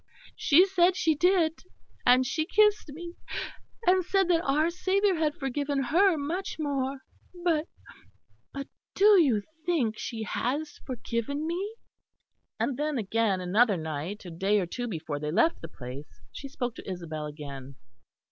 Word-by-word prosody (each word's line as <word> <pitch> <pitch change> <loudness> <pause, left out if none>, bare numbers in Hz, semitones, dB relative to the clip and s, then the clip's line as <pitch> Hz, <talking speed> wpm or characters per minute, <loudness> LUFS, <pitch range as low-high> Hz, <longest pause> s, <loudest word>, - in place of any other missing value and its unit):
She 335 +5 +5
said 370 -2 +3
she 325 -4 +2
did, 335 0 +2 0.5
and 250 +1 +6
she 315 +5 -1
kissed 420 -4 +3
me, 340 +4 -8 0.7
and 370 0 +4
said 385 +1 +1
that 335 -2 +4
our 305 +3 +2
Saviour 385 +3 +2
had 310 -2 0
forgiven 280 -1 -1
her 345 +6 +4
much 325 +7 -3
more. 275 -3 -2 0.4
But 330 -2 +1 0.8
but 275 0 -6 0.3
do 405 -2 +7
you 235 -10 +2 0.2
think 280 -11 0
she 225 -2 -4
has 285 +8 -2
forgiven 255 +3 -3
me?" 380 +7 -3 0.8
And 265 - 0
then 300 -1 -1
again, 215 -2 +1
another 200 +3 +3
night, 160 +6 -5
a 175 - -7
day 195 +5 +1
or 185 - 0
two 245 +8 -4
before 155 -7 -4
they 150 0 -3
left 330 - +2
the 165 - -6
place, 130 -4 -10
she 280 - -7
spoke 245 -3 -3
to - - -8
Isabel 160 -4 -5
again. 140 -3 -8
275 Hz, 150 wpm, -28 LUFS, 205-340 Hz, 0.8 s, do